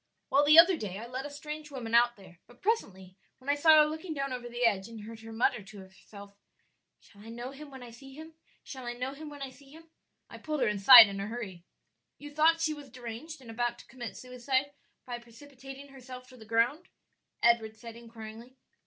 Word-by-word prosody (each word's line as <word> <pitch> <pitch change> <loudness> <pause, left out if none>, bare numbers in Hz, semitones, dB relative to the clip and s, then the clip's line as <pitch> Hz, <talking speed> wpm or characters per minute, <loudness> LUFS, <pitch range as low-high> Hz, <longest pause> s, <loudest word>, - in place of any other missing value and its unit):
"Well, 280 +2 +4
the 300 +2 +6
other 345 +1 +8
day 195 -6 -5
I 225 - -7
let 255 +3 -5
a - - -10
strange 300 +1 -8
woman 245 -5 -7
out 240 0 +4
there, 185 -4 -17
but 245 - -21
presently 190 - -2 0.2
when 265 +2 -10
I - - +2
saw 310 +1 +6
her - - +2
looking 315 +2 -5
down 275 -2 -3
over 245 -1 -6
the 240 +1 -1
edge 200 -4 +1
and 225 -2 -10
heard 225 +1 -10
her 225 0 -11
mutter 225 0 +1
to 200 +1 -13
herself, 200 +1 -14 0.7
'Shall 200 - -20
I 225 - -12
know 240 +3 -7
him 290 +2 -11
when 265 -2 -11
I 240 - -11
see 270 +3 -14
him? 320 +2 -11 0.3
shall 260 -3 -9
I 240 - -3
know 250 +2 -4
him 300 +2 -9
when 290 -1 -8
I 265 - -7
see 275 +1 -19
him?' 320 +2 -16 0.4
I - - -12
pulled 305 -3 -3
her 245 - +3
inside 210 +4 +10
in 200 -1 -6
a 200 - -4
hurry." 205 -7 -7 0.5
"You 290 0 -11
thought 325 +2 +3
she 310 -1 +1
was 290 -2 -11
deranged 255 +5 -9
and 235 -3 -11
about 240 +1 -2
to - - -15
commit 240 -3 -8
suicide 260 +2 -2 0.3
by 245 -1 -6
precipitating 270 +3 -13
herself 255 -1 -11
to 255 - -15
the 220 - -13
ground?" 235 - 0 0.6
Edward 225 -2 +3
said 230 +1 -10
inquiringly. 230 +2 -12
250 Hz, 225 wpm, -30 LUFS, 225-285 Hz, 0.7 s, inside